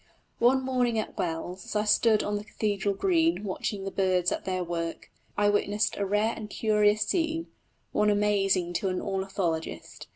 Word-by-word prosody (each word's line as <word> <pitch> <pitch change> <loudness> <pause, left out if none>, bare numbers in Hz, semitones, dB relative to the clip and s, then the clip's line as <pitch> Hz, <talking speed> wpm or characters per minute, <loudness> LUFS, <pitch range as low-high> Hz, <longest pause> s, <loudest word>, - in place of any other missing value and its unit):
One 260 +3 +4
morning 250 -3 +1
at 215 - -3
Wells 175 +2 -3
as - - -7
I 210 - +2
stood 215 0 +4
on 205 - -1
the 205 - -3
cathedral 205 -2 -1
green 330 - +2
watching 195 0 -3
the 195 - -4
birds 185 -2 +1
at - - -3
their 185 -1 -1
work, 170 -1 -4 0.3
I 205 0 +3
witnessed 205 +1 +1
a 200 - -1
rare 210 +3 +1
and 215 -2 -7
curious 210 -1 +2
scene 325 - -1 0.4
one 210 0 +2
amazing 195 -4 +2
to 195 - 0
an 185 - -1
ornithologist. 190 -4 -3
205 Hz, 170 wpm, -28 LUFS, 190-215 Hz, 0.4 s, One